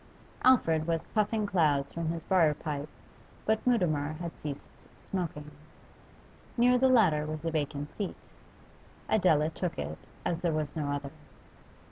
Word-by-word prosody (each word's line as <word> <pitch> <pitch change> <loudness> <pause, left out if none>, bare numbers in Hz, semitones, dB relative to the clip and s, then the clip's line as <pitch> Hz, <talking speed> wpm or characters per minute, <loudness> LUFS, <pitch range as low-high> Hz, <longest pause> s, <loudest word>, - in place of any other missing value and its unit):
Alfred 165 -11 +4
was 165 -1 0
puffing 215 0 +1
clouds 150 -8 +2
from 165 -1 -3
his 165 0 -3
briar 170 -6 +3
pipe, 150 -1 -4 0.6
but 220 0 +1
Mutimer 155 -11 +2
had 170 +1 -6
ceased 145 -2 -6 0.4
smoking. 155 -5 -4 1.1
Near 250 +1 +5
the 265 +1 +4
latter 165 -12 +4
was 155 +1 -5
a 165 - 0
vacant 145 -1 -3
seat; 200 -3 -5 0.8
Adela 160 -6 +3
took 170 +1 -3
it, - - -4 0.3
as 175 -2 0
there 170 -2 +1
was 155 -1 -2
no 150 -3 -2
other. 145 -1 -3
160 Hz, 140 wpm, -30 LUFS, 150-190 Hz, 1.1 s, Near